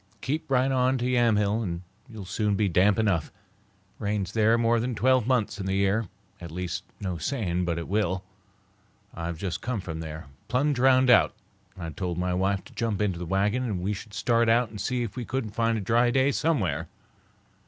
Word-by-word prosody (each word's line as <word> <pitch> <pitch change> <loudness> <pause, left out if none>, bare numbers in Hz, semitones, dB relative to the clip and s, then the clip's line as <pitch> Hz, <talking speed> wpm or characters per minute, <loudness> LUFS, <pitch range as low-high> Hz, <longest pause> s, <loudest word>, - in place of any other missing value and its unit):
"Keep 150 +4 -3
right 130 0 +2
on 130 0 +2
to 120 - -2
Yamhill 115 -4 +2
and 85 -4 -4 0.3
you'll 110 -4 -8
soon 105 +2 0
be 105 +1 +2
damp 95 +3 +3
enough. 100 -8 +1
It - - -24 0.7
rains 100 -2 -2
there 110 +1 +3
more 115 0 +2
than 120 +1 -2
twelve 130 0 +3
months 115 -4 +1
in 95 - -3
the 95 - 0
year; 100 +3 +1 0.3
at 85 - -7
least, 90 +2 -4 0.2
no 90 -4 -3
saying 90 - -1
but 85 -1 -1
it 85 - -4
will. 95 -2 0 0.9
I've 85 0 -4
just 90 0 -4
come 120 -1 -2
from 85 -4 -6
there, 80 -1 -7 0.2
plumb 130 +6 +1
drownded 130 -1 +5
out, 105 - +2 0.4
and 95 - -8
I 85 - -4
told 90 -2 -3
my 90 0 0
wife 95 +1 0
to - - -16
jump 115 -4 -1
into 95 -5 0
the 90 - -5
wagon 100 +7 +1
and 110 -7 -2
we 95 +4 -1
should 105 +1 -9
start 115 +1 +2
out 115 -1 +3
and 105 - -6
see 125 -1 -1
if 105 -3 -6
we 125 - -4
couldn't 120 -3 -3
find 115 +1 +1
a - - -3
dry 120 +5 +3
day 130 +3 +3
somewhere. 95 - 0
105 Hz, 205 wpm, -27 LUFS, 95-120 Hz, 0.9 s, drownded